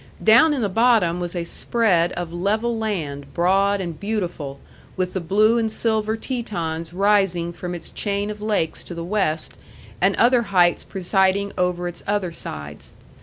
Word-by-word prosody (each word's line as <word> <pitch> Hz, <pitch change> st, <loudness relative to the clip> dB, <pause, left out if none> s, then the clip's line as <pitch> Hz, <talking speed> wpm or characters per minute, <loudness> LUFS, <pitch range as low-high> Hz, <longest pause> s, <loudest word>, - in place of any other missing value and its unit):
Down 230 Hz, +8 st, +7 dB
in 255 Hz, -, -1 dB
the -, -, +2 dB
bottom 210 Hz, -5 st, +3 dB
was 175 Hz, 0 st, -4 dB
a 175 Hz, -, -1 dB
spread 180 Hz, -2 st, +1 dB
of 175 Hz, -1 st, -5 dB
level 215 Hz, +7 st, 0 dB
land, 155 Hz, -11 st, -4 dB
broad 195 Hz, +3 st, +2 dB
and 170 Hz, -4 st, -5 dB
beautiful, 175 Hz, -10 st, -3 dB, 0.4 s
with 185 Hz, -1 st, -1 dB
the 190 Hz, -, -1 dB
blue 210 Hz, +7 st, +3 dB
and 220 Hz, -1 st, 0 dB
silver 220 Hz, -1 st, 0 dB
Tetons 170 Hz, -10 st, -4 dB
rising 190 Hz, -3 st, +1 dB
from 180 Hz, +1 st, -5 dB
its 165 Hz, -, -9 dB
chain 205 Hz, 0 st, -2 dB
of 210 Hz, 0 st, -9 dB
lakes 210 Hz, -7 st, -1 dB
to 175 Hz, -, -8 dB
the 170 Hz, 0 st, -5 dB
west, 170 Hz, -5 st, -1 dB, 0.5 s
and -, -, +3 dB
other 245 Hz, 0 st, +4 dB
heights 180 Hz, -5 st, +2 dB
presiding 190 Hz, +1 st, +1 dB
over 180 Hz, -1 st, 0 dB
its 175 Hz, -1 st, -7 dB
other 200 Hz, -3 st, 0 dB
sides. 75 Hz, -, -8 dB
190 Hz, 165 wpm, -22 LUFS, 170-215 Hz, 0.5 s, Down